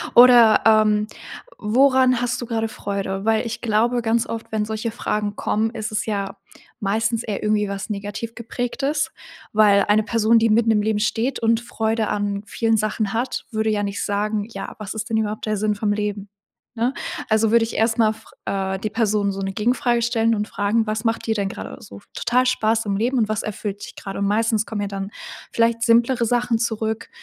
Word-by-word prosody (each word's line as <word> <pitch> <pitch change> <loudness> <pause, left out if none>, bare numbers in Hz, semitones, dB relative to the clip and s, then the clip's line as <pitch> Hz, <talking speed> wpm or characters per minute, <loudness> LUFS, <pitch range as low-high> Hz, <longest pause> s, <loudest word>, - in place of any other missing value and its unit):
oder, 240 -3 +8
ähm: 215 -1 +4 0.5
„Woran 255 +2 +3
hast 245 +1 -1
du - - -4
grade 225 -1 -1
Freude?“ 195 -2 -4
Weil 225 +1 +2
ich 230 - -5
glaube, 235 +2 +1
ganz 230 0 +1
oft, 225 -1 -6
wenn 215 -1 0
solche 220 +1 -3
Fragen 210 -2 -2
kommen, 220 +1 0
ist 220 -2 -5
es 210 - -1
ja 200 -2 -3 0.4
meistens 225 +3 0
eher 205 -2 -4
irgendwie 210 -1 +1
was 200 +2 -5
negativ 205 +3 -5
geprägtes, 270 +5 -2 0.4
weil 205 -2 +5
eine 210 +1 +4
Person, 230 0 +3
die 225 0 +3
mitten 225 +1 +3
im 210 -1 +3
Leben 210 0 0
steht 235 +4 0
und 230 0 +2
Freude 225 -2 -1
an 205 0 -2
vielen 225 +2 0
Sachen 215 -1 -1
hat, 245 +3 -2
würde 220 -1 0
ja 205 -1 0
nicht 200 0 -3
sagen: 205 +1 -1
„Ja, - - -6
was 205 -3 -5
ist 220 +1 -5
denn 225 - +1
überhaupt 215 -1 -2
der 215 -1 0
Sinn 210 +1 0
vom 205 0 0
Leben,“ 205 -1 -3 0.5
ne? 235 +4 0 0.4
Also, 220 0 +3
würde 230 0 +5
ich 225 - -7
erst 225 +1 +1
mal 220 -1 +3
fr 220 - -18
äh, 190 -1 -2
die 215 +2 -3
Person 210 -2 +1
so 195 0 -5
'ne 195 0 -3
Gegenfrage 240 +3 +1
stellen 230 -1 +2
und 210 0 -2
fragen: 215 +2 0
„Was 215 +1 -2
macht 225 0 -1
dir 220 - +1
denn 200 -2 -1
grade 95 - -7
so 100 0 -12
total 250 +2 +1
Spaß 225 -2 +1
im 200 - 0
Leben 245 +5 0
und 220 -3 +1
was 215 -1 -1
erfüllt 205 -1 -5
dich - - -12
grad?“ 195 -1 -7
Und 200 - 0
meistens 215 +1 +1
kommen 215 -2 -4
ja 205 - -2
dann 195 0 -5 0.4
vielleicht 230 0 +1
simplere 235 +1 +3
Sachen 240 0 +1
zurück, 220 -1 -2
220 Hz, 205 wpm, -22 LUFS, 210-230 Hz, 0.5 s, oder